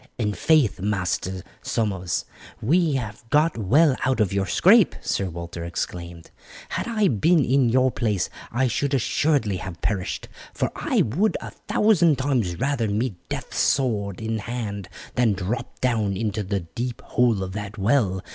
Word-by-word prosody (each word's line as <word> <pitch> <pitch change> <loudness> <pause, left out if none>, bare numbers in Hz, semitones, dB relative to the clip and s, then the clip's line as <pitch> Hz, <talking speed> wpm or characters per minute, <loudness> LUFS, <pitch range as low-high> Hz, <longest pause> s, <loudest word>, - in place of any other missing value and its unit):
"In 105 -3 0
faith, 150 -5 +3
Master 95 -2 -2 0.2
Somers, 95 -6 -1 0.3
you 160 +3 +2
have 110 -2 -6
got 155 +4 +3
well 130 - +4
out 130 -2 +1
of 100 -3 +2
your 100 -1 0
scrape," 190 - +5
Sir 95 -2 -1
Walter 85 0 -6
exclaimed. 85 0 -5 0.4
"Had - - -3
I 215 -3 +2
been 150 - +3
in 130 -1 +3
your 130 +2 +3
place 105 -7 0 0.2
I 130 +3 +1
should 140 +4 0
assuredly 130 -5 +1
have 90 -1 -7
perished, 95 -4 -2 0.3
for - - -1
I - - +1
would 180 - +1
a - - -8
thousand 175 -9 +2
times 120 -11 0
rather 140 -5 0
meet 110 +3 -1 0.2
death - - -5
sword 105 -8 +1
in 110 0 -2
hand, 105 -4 -5 0.2
than 120 -4 +3
drop 100 +5 -4
down 110 -6 +1
into 110 0 -1
the 100 0 -2
deep 120 +8 -5
hole 120 -6 +2
of 95 - -5
that 105 +2 -6
well. 100 -3 +1
110 Hz, 155 wpm, -24 LUFS, 95-135 Hz, 0.4 s, scrape